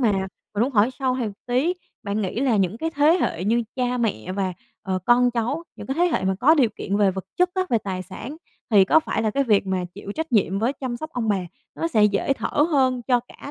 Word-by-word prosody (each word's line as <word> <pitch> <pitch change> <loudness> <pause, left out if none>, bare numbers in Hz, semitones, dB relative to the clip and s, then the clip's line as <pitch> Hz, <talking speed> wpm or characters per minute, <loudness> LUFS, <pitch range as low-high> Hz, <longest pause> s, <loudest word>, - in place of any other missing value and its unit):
mà 225 -5 +3 0.4
mình 210 - +1
muốn 260 - +1
hỏi 220 +3 +4
sâu 260 -2 +1
thêm 245 - -1
một - - -8
tí, 265 +9 +1 0.3
bạn 205 +1 -2
nghĩ 200 +6 -2
là 255 -6 +2
những 195 +3 0
cái 325 0 -2
thế 310 +4 +4
hệ 180 - -1
như 235 +3 +2
cha 250 -1 0
mẹ 190 - -2
và, 190 -1 -1 0.3
ờ, 190 -1 -1
con 245 +1 +5
cháu, 245 +7 -2
những - - -9
cái 270 - -2
thế 345 +4 +2
hệ 325 - 0
mà 190 0 +1
có 305 +6 +6
điều 260 -7 +4
kiện 200 +1 -2
về 200 -2 +4
vật 190 0 -6
chất 360 0 +3
á, 375 - +2
về 230 - +3
tài 190 -3 -4
sản 225 +10 -8 0.3
thì 200 -3 +6
có 320 - +5
phải 225 -7 -2
là 215 - +1
cái 275 +5 0
việc 210 -5 +3
mà 185 -1 -1
chịu 200 - -7
trách 320 0 -4
nhiệm 195 -3 +2
với 235 +6 +1
chăm 255 -3 -5
sóc 310 +5 -7
ông 230 -3 -2
bà 205 - +3 0.4
nó 330 - -2
sẽ 215 -9 +4
dễ 205 +6 +2
thở 290 +2 0
hơn 260 -4 +2
cho 245 -2 +4
cả 250 +3 -12
235 Hz, 260 wpm, -23 LUFS, 200-275 Hz, 0.4 s, có